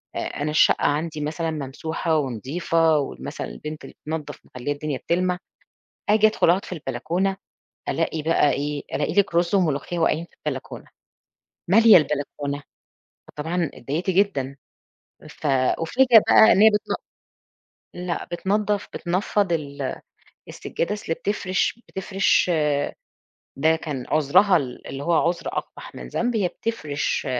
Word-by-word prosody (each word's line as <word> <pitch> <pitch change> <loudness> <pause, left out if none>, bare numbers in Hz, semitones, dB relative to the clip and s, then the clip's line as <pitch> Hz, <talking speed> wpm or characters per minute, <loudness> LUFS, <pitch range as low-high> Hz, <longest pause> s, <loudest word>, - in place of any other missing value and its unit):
آآ - - -2
أنا 150 +1 -3
الشقة 150 - +4
عندي 155 +1 -1
مثلًا 160 +2 -2
ممسوحة 160 +3 -2
ونضيفة 155 +5 +1
وال 65 - -5
مثلًا - - -5
البنت 150 - -8
اللي - - -11
بتنضّف 155 -1 -5
مخلّية 125 +3 -5
الدنيا 145 -1 -3
بتلمَع، 180 +5 0 0.7
آجي 215 +1 +5
أدخُل 215 -5 +3
أقعُد 185 +3 +2
في - - -10
البلكونة 185 +3 -2 0.5
ألاقي 160 - -1
بقى 155 -1 +3
إيه، 145 0 -2
ألاقي 145 - -1
لِك 200 -4 +2
رُز 170 +3 +2
وملوخية 170 -2 0
واقعين 165 0 +1
في - - -29
البلكونة، - - -5 0.8
مالية 220 +3 +8
البلكونة، 145 -1 -2 0.7
فطبعًا 165 +1 -2
اتضايِقت 165 +7 -2
جدًا 175 -9 +1 0.7
ف - - -7
أُفاجأ 165 - +4
بقى 220 - +8
إن 190 - +3
هي 220 - +8
بتن 210 -1 -1 1.0
لأ 180 -1 -3
بتنضّف 205 +3 0
بتنفّض 185 +1 0
ال 140 -4 -3 0.5
السجّادة، 170 - -3
أصْل 205 -6 -3
بتفرِش 190 +3 -1
بتفرِش 190 -1 +1 1.1
ده 160 +3 +3
كان 145 -6 -5
عُذرها 155 +6 +4
ال 130 -6 -4
اللي 135 - -6
هو 170 - +1 0.2
عُذر 175 0 -3
أقبح - - -6
من 60 -1 -8
ذنب، 240 - -1
هي 195 -4 +1
بتفرِش 155 -11 -3
165 Hz, 135 wpm, -23 LUFS, 145-185 Hz, 1.1 s, مالية